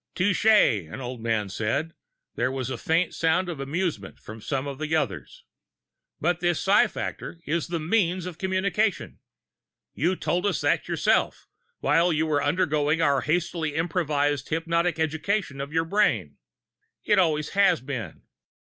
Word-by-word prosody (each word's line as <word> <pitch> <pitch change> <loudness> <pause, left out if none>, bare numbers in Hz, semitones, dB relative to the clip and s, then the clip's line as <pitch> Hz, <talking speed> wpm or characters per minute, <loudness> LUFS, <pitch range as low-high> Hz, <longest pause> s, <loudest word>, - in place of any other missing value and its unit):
"Touché," 180 - +3
an - - -6
older 125 -2 -6
man 110 -3 0
said, 110 +7 -1
and 165 - -19 0.4
there 130 - 0
was 130 -1 -3
a 130 - -3
faint 165 +2 +1
sound 165 +3 +1
of 165 -5 -5
amusement 145 - -3
from 110 +1 -11
some 135 +4 -2
of 140 -1 -6
the 155 +1 -1
others. 135 -11 -3 0.8
"But 175 +1 0
this 175 -1 +1
psi 200 +2 +4
factor 170 - -6
is 165 +2 -1
the 170 -1 -2
means 180 +1 0
of 175 -2 -7
communication! 190 +2 -1 0.7
You 175 +7 0
told 180 +2 -1
us - - -1
that - - +1
yourself, - - +1 0.4
while 170 +2 +3
you 160 0 +1
were 150 -2 +1
undergoing 150 -1 +1
our 140 -4 +3
hastily 160 0 -1
improvised 150 -4 0
hypnotic 170 +2 0
education 160 -1 -1
of 140 +1 -6
your 165 +1 +1
brain. 115 - +1 0.7
It 210 -2 +3
always 155 -4 +1
has 200 0 +3
been. 125 - -6
160 Hz, 155 wpm, -25 LUFS, 140-180 Hz, 0.8 s, psi